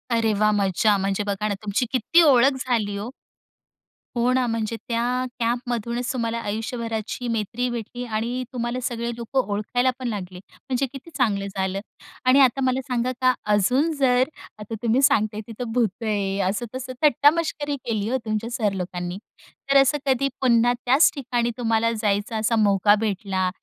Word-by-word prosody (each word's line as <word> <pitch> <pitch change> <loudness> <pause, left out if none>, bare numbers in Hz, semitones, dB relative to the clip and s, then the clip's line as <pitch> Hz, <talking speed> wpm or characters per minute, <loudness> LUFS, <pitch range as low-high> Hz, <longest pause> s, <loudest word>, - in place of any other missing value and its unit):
अरे 225 -1 +2
वाह! 215 0 +4
मजा 200 +2 +2
म्हणजे 195 +1 -1
बघा 200 +1 -1
ना, 205 - 0
तुमची 210 +4 0
किती 265 +7 +4
ओळख 265 +2 +5
झाली 215 -5 0
हो. 205 +4 -5 1.1
हो 240 +1 +2
ना, 255 -1 +2
म्हणजे 230 -1 -2
त्या 245 +1 0 0.2
कॅम्पमधूनच 240 0 -1
तुम्हाला 230 -2 -2
आयुष्यभराची 225 +2 -4
मैत्री 230 +2 -1
भेटली 240 +1 -5
आणि 235 +3 -2
तुम्हाला 240 +1 -2
सगळे 235 -1 -2
लोकं 235 +3 -1
ओळखायला 245 +5 +1
पण 255 - -3
लागले, 185 -5 -5
म्हणजे 265 0 -2
किती 275 +4 -10
चांगलं 200 -6 +1
झालं. 190 0 -1 0.5
आणि 255 +2 +6
आता 265 0 +4
मला 260 +1 +1
सांगा 250 0 0
का, 255 0 +5 0.2
अजून 255 - +2
जर 250 -1 +4 0.4
आता 210 +2 -6
तुम्ही 235 +3 +3
सांगताय 215 -5 +2
तिथं 230 +1 -6
भूतं 225 -3 0
आहे, 200 -2 -1
असं 215 +5 -2
तसं 260 0 -5
थट्टामस्करी 295 +1 +3
केली 215 -2 -1
हो 260 - +1
तुमच्या 215 +1 -2
सर 220 -5 0
लोकांनी. 180 -1 -4 0.5
तर 275 - +6
असं 275 +2 +2
कधी 270 0 +2
पुन्हा 240 -1 +4
त्याच 265 +6 +6
ठिकाणी 240 -3 -1
तुम्हाला 230 -1 +1
जायचं 215 0 -1
असा 220 +2 +1
मौका 205 -1 +4
भेटला, 195 -3 -1
230 Hz, 160 wpm, -23 LUFS, 210-250 Hz, 1.1 s, आणि